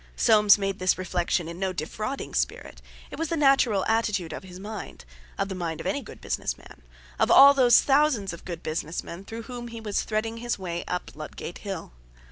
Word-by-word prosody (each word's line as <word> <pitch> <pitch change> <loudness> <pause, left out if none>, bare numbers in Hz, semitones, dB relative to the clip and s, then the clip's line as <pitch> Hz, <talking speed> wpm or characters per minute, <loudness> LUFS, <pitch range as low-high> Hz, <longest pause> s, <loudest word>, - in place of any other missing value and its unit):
Soames 210 - +6
made 195 -1 -2
this 185 0 +2
reflection 175 -2 -1
in 170 +1 -7
no 190 -1 0
defrauding 215 - -4
spirit; - - -2 0.3
it - - -8
was 325 - -1
the 330 - -2
natural 270 -9 +3
attitude 210 -6 0
of - - -6
his 185 -1 -11
mind—of 60 - -7
the 195 - -5
mind 170 -3 -4
of - - -7
any - - -1
good - - -12
business - - -3
man—of - - -6
all 280 +1 +9
those 250 -3 +6
thousands 270 - +2
of 170 - -10
good 170 -2 -7
business 155 +1 -3
men 170 +3 -8
through 225 +3 -7
whom 240 0 -7
he 230 -1 -8
was 210 -2 -1
threading 225 +1 -2
his 240 +1 -2
way 175 -3 -4
up 180 - -3
Ludgate 155 +3 -7
Hill. 195 - -6
195 Hz, 195 wpm, -26 LUFS, 170-230 Hz, 0.3 s, all